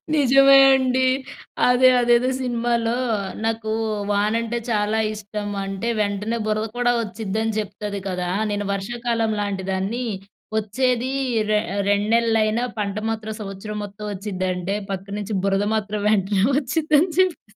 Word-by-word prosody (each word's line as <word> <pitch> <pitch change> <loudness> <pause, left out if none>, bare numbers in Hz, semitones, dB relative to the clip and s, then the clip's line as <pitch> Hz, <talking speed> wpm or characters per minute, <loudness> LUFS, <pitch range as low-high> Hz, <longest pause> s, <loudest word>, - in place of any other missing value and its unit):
నిజమే 275 -1 +6 0.2
అండి. 260 0 +2 0.6
అదే, 250 +1 +6
అదేదో 240 +1 +3
సినిమాలో, 235 -1 0 0.5
నాకు 225 -1 -1 0.4
వానంటే 225 +3 0
చాలా 210 0 +1
ఇష్టం. 205 0 -5 0.2
అంటే 195 +4 -3
వెంటనే 205 +3 -1
బురద 215 0 0
కూడా 245 0 +3
వచ్చిద్డి, 215 0 -4
అని 225 0 -1
చెప్తది 205 0 -5
కదా! 180 -1 -2 0.2
నేను 205 0 -2
వర్షాకాలం 230 +2 -1
లాంటి 195 -2 -3
దాన్ని, 200 +7 -2 0.5
వచ్చేది 245 +4 0 0.4
రె 215 - +3 0.3
రెండు 205 +1 +2
నెలలైనా 225 0 +2
పంట 200 -1 -2
మాత్రం 220 -1 -4
సంవత్సరం 205 +1 -6
మొత్తం 205 +1 -9
వచ్చిందంటే, 185 -1 -3 0.2
పక్కనుంచి 200 +2 -4
బురద 195 +1 +1
మాత్రం 210 -1 -2
వెంటనే 195 -2 +2
వచ్చిద్డి 305 +3 0
అని 355 +1 0
చెప్త 370 -3 +2
215 Hz, 125 wpm, -22 LUFS, 200-240 Hz, 0.6 s, నిజమే